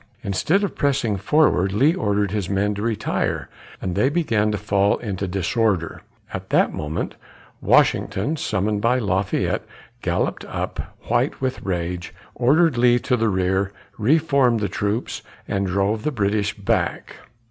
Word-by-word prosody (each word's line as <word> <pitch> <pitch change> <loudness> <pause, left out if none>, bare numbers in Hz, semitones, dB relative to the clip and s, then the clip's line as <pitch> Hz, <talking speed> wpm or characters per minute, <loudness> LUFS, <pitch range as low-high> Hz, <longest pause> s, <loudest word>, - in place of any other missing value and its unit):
Instead 160 - +1
of 200 - -1
pressing 130 -7 +1
forward, 100 - +2
Lee 140 +10 +4
ordered 105 - 0
his 100 -4 -2
men 100 +1 +1
to 100 - -5
retire, 110 -1 -1 0.3
and 90 - -3
they 105 +8 +2
began 115 -10 +1
to 105 - -1
fall 100 0 +2
into 100 -4 -4
disorder. 95 -1 0 0.3
At - - -6
that - - +3
moment, 75 +2 -3 0.5
Washington, 110 +12 +2
summoned 105 -6 -1
by 120 +3 +3
Lafayette, 100 -4 0 0.4
galloped - - -1
up, - - -5
white - - +1
with 130 -1 -2
rage, 90 -1 -3 0.2
ordered 140 +2 +3
Lee 120 0 +5
to 125 +1 0
the 115 -2 +1
rear, 95 0 0 0.3
re 130 +9 +4
formed 140 -7 +2
the 105 - 0
troops, 105 +4 -2 0.3
and 100 -1 -1
drove 100 +3 0
the 150 - -1
British 105 -3 0
back. 100 - -1
105 Hz, 145 wpm, -22 LUFS, 95-125 Hz, 0.5 s, Lee